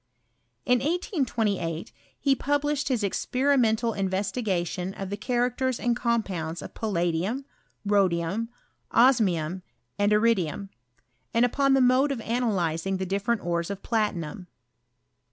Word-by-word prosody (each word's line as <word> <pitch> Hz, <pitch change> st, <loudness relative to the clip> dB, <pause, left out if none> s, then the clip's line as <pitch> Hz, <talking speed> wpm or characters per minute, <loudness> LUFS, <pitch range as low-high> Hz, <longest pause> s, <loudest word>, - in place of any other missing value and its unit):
In 250 Hz, -1 st, +4 dB
1828 235 Hz, -, -1 dB, 0.3 s
ho 275 Hz, -1 st, +5 dB
published 290 Hz, 0 st, 0 dB
his 250 Hz, -6 st, 0 dB
experimental 235 Hz, +1 st, +1 dB
investi 195 Hz, +4 st, -1 dB
gation 180 Hz, -1 st, -2 dB
of 195 Hz, 0 st, -4 dB
the -, -, -1 dB
cliaractera 245 Hz, +3 st, 0 dB
and 240 Hz, -1 st, +1 dB
compounds 190 Hz, -10 st, -1 dB
of -, -, -9 dB
palla 195 Hz, -6 st, -1 dB
dium, 205 Hz, +12 st, -2 dB, 0.4 s
rhodium, 195 Hz, +1 st, +1 dB, 0.4 s
osmium, 190 Hz, -9 st, +3 dB, 0.4 s
aud 205 Hz, 0 st, +3 dB
iridium; 205 Hz, -4 st, +1 dB, 0.7 s
and 235 Hz, +1 st, +5 dB
upon 275 Hz, +2 st, +2 dB
the 270 Hz, -, +4 dB
mode 255 Hz, +3 st, +4 dB
of 270 Hz, -, -2 dB
analyzing 195 Hz, -7 st, 0 dB
the 190 Hz, -, -3 dB
di£ferent_ores 190 Hz, -3 st, -1 dB
of 200 Hz, -1 st, -6 dB
platinum. 185 Hz, -7 st, -2 dB
215 Hz, 115 wpm, -26 LUFS, 185-250 Hz, 0.7 s, ho